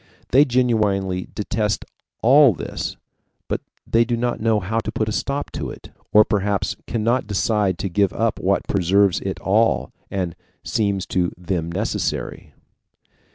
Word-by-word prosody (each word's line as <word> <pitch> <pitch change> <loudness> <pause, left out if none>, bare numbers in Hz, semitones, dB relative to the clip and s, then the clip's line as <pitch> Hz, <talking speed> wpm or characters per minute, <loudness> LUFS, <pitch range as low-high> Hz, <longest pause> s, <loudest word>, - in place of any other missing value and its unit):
They 140 +4 +6
genuinely 105 -7 +1
detest 105 0 -1 0.4
all 135 +1 +7
this, - - -5 0.5
but - - -2 0.2
they 115 +1 +3
do 120 0 -1
not 120 +1 -1
know 110 -1 +2
how 105 +4 -1
to - - -4
put 110 - -1
a - - -1
stop 140 +6 -2
to - - -4
it, - - -11 0.2
or 105 0 +7
perhaps 100 -1 0
cannot 115 +1 0
decide 105 -2 +1
to 100 - -2
give 95 +1 +2
up 115 +3 -1
what 100 +1 0
preserves 95 0 +3
it 95 -1 -4
all, 110 +4 +2 0.2
and 90 -4 -2 0.3
seems 100 -4 0
to 90 -1 +1
them 85 -2 -2
necessary. - - -3
105 Hz, 150 wpm, -22 LUFS, 95-115 Hz, 0.5 s, all